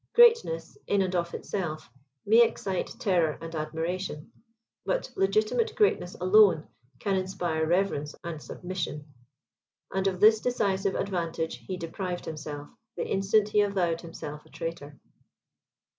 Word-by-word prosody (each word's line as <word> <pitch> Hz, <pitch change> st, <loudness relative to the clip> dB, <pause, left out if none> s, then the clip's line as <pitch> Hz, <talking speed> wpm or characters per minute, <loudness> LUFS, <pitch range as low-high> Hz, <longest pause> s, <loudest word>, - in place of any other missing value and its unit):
Greatness, 475 Hz, 0 st, +4 dB
in 200 Hz, -1 st, +3 dB
and 185 Hz, -1 st, -2 dB
of 170 Hz, -1 st, 0 dB
itself, 160 Hz, -6 st, -4 dB, 0.4 s
may 225 Hz, +3 st, +6 dB
excite 200 Hz, -5 st, -1 dB
terror 175 Hz, -7 st, +1 dB
and 165 Hz, 0 st, -8 dB
admiration; 160 Hz, +3 st, -3 dB, 0.5 s
but -, -, -1 dB
legitimate 215 Hz, -, +1 dB
greatness 410 Hz, -, +2 dB
alone 185 Hz, -3 st, +5 dB, 0.3 s
can 200 Hz, -2 st, 0 dB
inspire 175 Hz, -4 st, -1 dB
reverence 170 Hz, -4 st, 0 dB
and 165 Hz, -3 st, -5 dB
submission; 175 Hz, -5 st, -5 dB, 0.9 s
and 190 Hz, 0 st, +1 dB
of 185 Hz, -2 st, -1 dB
this 215 Hz, +2 st, +7 dB
decisive 195 Hz, -5 st, 0 dB
advantage 170 Hz, -4 st, -2 dB
he 185 Hz, -, -3 dB
deprived 175 Hz, +1 st, -4 dB
himself, 150 Hz, -2 st, -7 dB, 0.2 s
the -, -, -1 dB
instant 200 Hz, +2 st, +2 dB
he 210 Hz, 0 st, +4 dB
avowed 180 Hz, -5 st, 0 dB
himself 150 Hz, -3 st, -8 dB
a -, -, -21 dB
traitor. 150 Hz, -3 st, -6 dB
185 Hz, 130 wpm, -28 LUFS, 165-200 Hz, 0.9 s, this